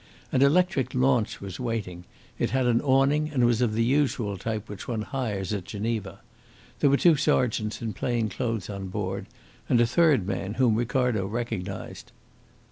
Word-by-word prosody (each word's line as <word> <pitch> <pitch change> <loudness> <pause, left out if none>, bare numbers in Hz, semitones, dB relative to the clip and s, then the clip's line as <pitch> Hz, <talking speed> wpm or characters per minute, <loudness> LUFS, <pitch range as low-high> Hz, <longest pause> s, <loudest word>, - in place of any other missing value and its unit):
An 130 - +2
electric 155 -1 +2
launch 125 -3 +1
was 95 -2 -7
waiting. 105 -8 -4 0.3
It - - +1
had 130 0 +1
an 120 -1 +3
awning 140 +3 +2
and 130 -5 +2
was 120 0 +2
of 110 -3 +1
the 115 - +2
usual 125 -5 +1
type 110 +2 -4
which 105 -1 -8
one 115 -3 -2
hires 105 -7 -3
at 100 -3 -3
Geneva. 110 +1 -4 0.6
There 145 - +4
were 140 - +4
two 170 +1 +5
sergeants 120 -7 0
in 110 -2 -3
plain 120 -3 -1
clothes 115 0 -3
on 100 -2 -5
board, 95 0 -4 0.4
and 120 - +4
a 120 - +5
third 140 - +3
man, 95 +1 -3
whom 125 -3 +3
Ricardo 120 -3 0
recognised. 105 -4 -5
115 Hz, 170 wpm, -26 LUFS, 105-130 Hz, 0.6 s, two